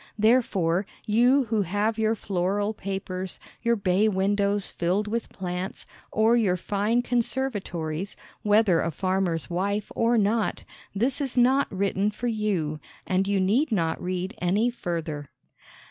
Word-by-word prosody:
Therefore 205 -6 +2 0.2
you 245 +6 +4
who 220 -3 0
have 205 +4 0
your 220 0 +2
floral 200 +2 -1
papers, 190 -2 -5 0.2
your 235 0 +2
bay 200 +1 +2
windows 200 0 +1
filled 185 +5 0
with 230 +1 -2
plants, 180 0 -5 0.3
or 220 +2 +4
your 200 -6 +2
fine 210 +6 0
conservatories, 205 -9 -2 0.3
whether 210 -4 +4
a - - 0
farmer's 185 -1 -1
wife 200 +4 -2
or 230 +1 +3
not, 215 +1 +1 0.3
this 255 +8 0
is 265 -3 -3
not 260 +3 +4
written 195 +1 0
for 215 +3 -6
you, 205 -10 -1 0.3
and 190 +1 +1
you 200 -1 +1
need 225 +10 +2
not 165 -6 0
read 185 +2 -3
any 205 +7 +2
further. 165 - -4
200 Hz, 135 wpm, -26 LUFS, 185-225 Hz, 0.3 s, you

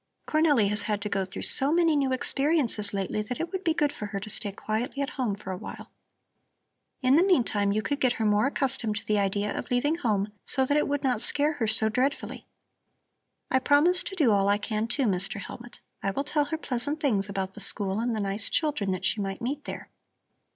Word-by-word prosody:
"Cornelli 300 -9 +3
has 210 0 0
had 210 0 -1
to 210 - -3
go 195 -2 -1
through 185 - -7
so 275 +2 +5
many 330 -1 +3
new 275 -2 +1
experiences 260 -5 +1
lately 200 +1 -2
that 220 +3 -5
it 335 - -3
would 380 -1 -4
be 325 -3 +1
good 295 -3 +1
for 210 - -6
her 200 -1 -4
to 215 - -5
stay 205 0 0
quietly 230 +8 -3
at 275 - -4
home 245 -7 -2
for 190 -1 -8
a 185 - -4
while. - - -9 1.1
In 260 +3 +5
the 340 - +5
meantime 230 - +2
you 215 +1 0
could 285 -1 -2
get 255 -2 +2
her 220 - -2
more 210 +4 +3
accustomed 265 -6 0
to 205 - -5
the 210 -1 +1
idea 200 +1 -1
of - - -5
leaving 290 +6 +1
home, 210 - -1
so 265 -1 +1
that 285 - +1
it 300 - +2
would 285 -1 -2
not 250 -5 +1
scare 295 +5 +1
her 245 -7 -2
so 220 0 +4
dreadfully. 255 +5 -2 1.0
I 260 - +4
promise 300 +7 +4
to 385 - -4
do 290 -11 +3
all 200 -1 +3
I 205 - +3
can 215 +1 -2
too, 270 +4 -1
Mr. 195 0 0
Hellmut. 235 +5 -10 0.2
I 195 - -1
will 275 +8 -2
tell 295 0 +1
her 320 +2 -3
pleasant 285 +1 -2
things 210 -9 +1
about 195 -1 -3
the - - -10
school 200 -1 -1
and 235 0 -1
the - - -2
nice 200 +1 +1
children 295 -11 0
that 185 0 -4
she 205 +2 +2
might 195 -1 -4
meet 280 +5 -4
there." - - -7
235 Hz, 230 wpm, -27 LUFS, 205-285 Hz, 1.1 s, so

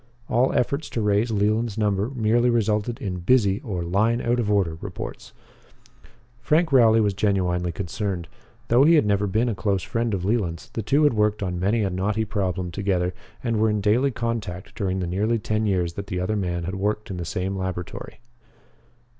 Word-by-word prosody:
All 125 +3 +3
efforts 140 +5 0
to - - -3
raise 105 +2 +2
Leland's 110 +1 0
number 105 0 +1
merely 120 -1 +2
resulted 115 0 0
in 90 -3 -4
"busy" 100 0 +3
or 100 - -4
"line 105 +7 +1
out 120 +1 0
of 110 -3 -1
order" 90 -6 +1
reports. - - -7 1.1
Frank 160 +6 +2
Rowley 115 -4 +6
was 105 -2 +2
genuinely 90 -3 0
concerned. 95 -1 -4 0.4
Though 120 +3 +5
he 165 +3 +6
had 150 - +4
never 100 0 +1
been 110 +5 +1
a 115 - 0
close 100 -2 -1
friend 115 -3 -1
of 90 -1 -4
Leland's, 95 -6 -1
the 115 - -3
two 140 +8 +2
had 145 - +4
worked 105 -1 +1
on 90 -2 -2
many 105 +5 +1
a 95 - -1
knotty 105 +4 -1
problem 95 -4 -2
together 90 -1 -1 0.3
and 115 -3 0
were 110 0 +3
in 105 0 0
daily 110 +7 +2
contact 115 -7 -4
during 95 -1 -2
the - - -1
nearly 105 +7 0
ten 110 0 -1
years 90 -4 0
that 100 +2 -6
the 90 - -3
other 95 +4 -1
man 90 -4 -2
had 95 +3 -4
worked 105 +2 -2
in 95 - -4
the 85 - -4
same 90 +3 -3
laboratory. 95 +1 -5
105 Hz, 190 wpm, -24 LUFS, 95-115 Hz, 1.1 s, Rowley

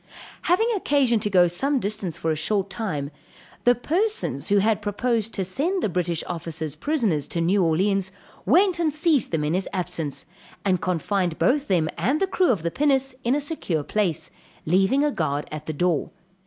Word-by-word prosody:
Having 365 +7 +2
occasion 280 - +2
to 210 - -1
go 185 -3 +5
to 175 - +2
some 270 +11 0
distance 200 -5 -3
for 160 - -1
a - - 0
short 195 +5 -1
time, 155 -9 -3 0.5
the 245 0 +6
persons 330 - -1
who 205 - +4
had 215 +1 +2
proposed 225 +1 -1
to 190 - -1
send 325 - -1
the - - +1
British 175 -2 -1
officers 160 -3 -4
prisoners 200 - 0
to 170 - -3
New 185 +4 +2
Orleans, 190 +3 +1 0.3
went 370 -2 +3
and 325 -3 +2
seized 305 -3 +2
them 160 -3 -1
in 150 +2 0
his 190 +2 -1
absence, 180 -6 -3 0.4
and 185 -3 +2
confined 180 -1 -1
both 285 +2 +2
them 175 -5 +2
and 255 - +1
the 390 - +3
crew 375 -1 +1
of 200 -9 +1
the 170 - -1
pinnace, 270 -2 +1
in 240 +3 +2
a - - +1
secure 275 - -2
place, 190 -2 -1 0.3
leaving 195 - +3
a 295 - +2
guard 150 - -2
at 155 -1 -7
the 155 - -2
door. 170 -1 0
195 Hz, 190 wpm, -24 LUFS, 170-270 Hz, 0.5 s, the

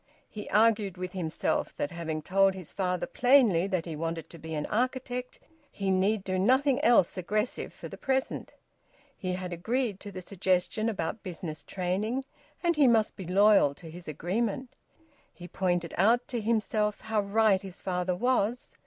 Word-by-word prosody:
He 210 -1 -8
argued 210 -3 +3
with 180 0 -5
himself 170 -4 -2
that 145 - -2
having 160 -2 -4
told 195 +2 +3
his 185 -4 -9
father 180 -2 -1
plainly 245 -9 +4
that 185 -4 -1
he 165 -3 -5
wanted 165 +1 -4
to 170 - -11
be 160 +1 -6
an 150 - -2
architect, 250 +2 -2 0.3
he 195 -1 -1
need 195 +2 +2
do 185 -1 -1
nothing 260 +6 +3
else 190 -6 +4
aggressive 210 +6 -2
for - - -9
the - - -10
present. 265 -1 -2 0.6
He 185 -1 -3
had 180 -1 -4
agreed 220 +4 -1
to 205 - -9
the 185 -1 -7
suggestion 190 +3 0
about 205 +1 -3
business 165 -5 -6
training, 205 +8 -2 0.4
and 340 -1 +2
he 290 -3 +5
must 225 -3 +3
be 190 -4 -8
loyal 195 -6 +5
to 165 0 -11
his 175 +1 -11
agreement. 210 - -2 0.6
He 175 - -11
pointed 175 -2 -1
out 235 +6 +4
to 240 -3 -2
himself 215 -1 0
how 220 -1 0
right 200 -1 +3
his 190 -2 -9
father 180 -1 -1
was. 245 +2 0
195 Hz, 170 wpm, -29 LUFS, 180-225 Hz, 0.6 s, he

